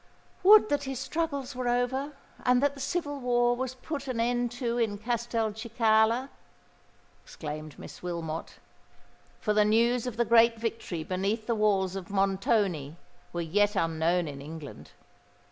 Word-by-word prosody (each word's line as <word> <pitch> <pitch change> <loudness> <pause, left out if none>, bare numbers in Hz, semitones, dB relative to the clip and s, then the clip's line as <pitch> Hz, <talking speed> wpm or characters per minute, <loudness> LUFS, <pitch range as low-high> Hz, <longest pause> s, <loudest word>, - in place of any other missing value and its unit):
"Would 425 +2 +7
that 285 -1 0
his 270 -1 -4
struggles 280 -1 -3
were 250 -1 -3
over, 255 +4 0 0.3
and 250 0 +4
that 285 -1 +3
the 280 - -12
civil 290 0 -2
war 240 -1 +2
was 260 +1 -4
put 280 +1 -6
an 250 -3 -2
end 240 +1 +1
to 240 -1 -2
in 215 -3 0
Castelcicala!" 230 +1 +1 0.9
exclaimed 155 -1 -7
Miss - - -11
Wilmot—for 170 +4 -7
the 210 0 +4
news 235 +3 +2
of 240 -2 -5
the 235 - +2
great 230 0 +5
victory 225 -7 -4
beneath 195 +6 -2
the 235 - 0
walls 195 -4 +1
of 190 -3 -6
Montoni 195 -5 0 0.3
were 175 - -3
yet 205 +6 +1
unknown 165 0 +1
in 140 -1 -7
England. 150 0 -9
230 Hz, 145 wpm, -28 LUFS, 190-250 Hz, 0.9 s, Would